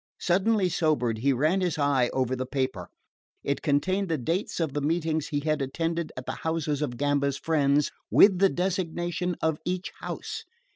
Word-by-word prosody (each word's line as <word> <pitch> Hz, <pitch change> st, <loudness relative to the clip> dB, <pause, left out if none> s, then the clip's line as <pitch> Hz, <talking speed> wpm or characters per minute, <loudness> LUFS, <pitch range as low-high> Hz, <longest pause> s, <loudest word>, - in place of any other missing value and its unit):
Suddenly 190 Hz, +2 st, +2 dB
sobered, 145 Hz, -10 st, +1 dB
he 140 Hz, +4 st, +2 dB
ran 155 Hz, +9 st, +2 dB
his 175 Hz, -4 st, 0 dB
eye 140 Hz, -4 st, +2 dB
over 130 Hz, -1 st, 0 dB
the 130 Hz, 0 st, -4 dB
paper. 130 Hz, -10 st, -2 dB, 0.6 s
It 140 Hz, -, -1 dB
contained 185 Hz, +6 st, +1 dB
the 160 Hz, -, +1 dB
dates 165 Hz, -, -2 dB
of 160 Hz, -5 st, -1 dB
the 145 Hz, -, -1 dB
meetings 160 Hz, 0 st, 0 dB
he 145 Hz, -1 st, -2 dB
had 155 Hz, -1 st, 0 dB
attended 165 Hz, +4 st, -2 dB
at 130 Hz, -, -6 dB
the -, -, -4 dB
houses 160 Hz, -3 st, -1 dB
of 125 Hz, -5 st, -2 dB
Gamba's 140 Hz, 0 st, +1 dB
friends, 145 Hz, -2 st, +2 dB, 0.2 s
with 195 Hz, -3 st, +6 dB
the 195 Hz, 0 st, +5 dB
designation 180 Hz, -1 st, -1 dB
of 160 Hz, -1 st, +1 dB
each 180 Hz, +1 st, -3 dB
house. -, -, -5 dB
155 Hz, 175 wpm, -27 LUFS, 140-175 Hz, 0.6 s, with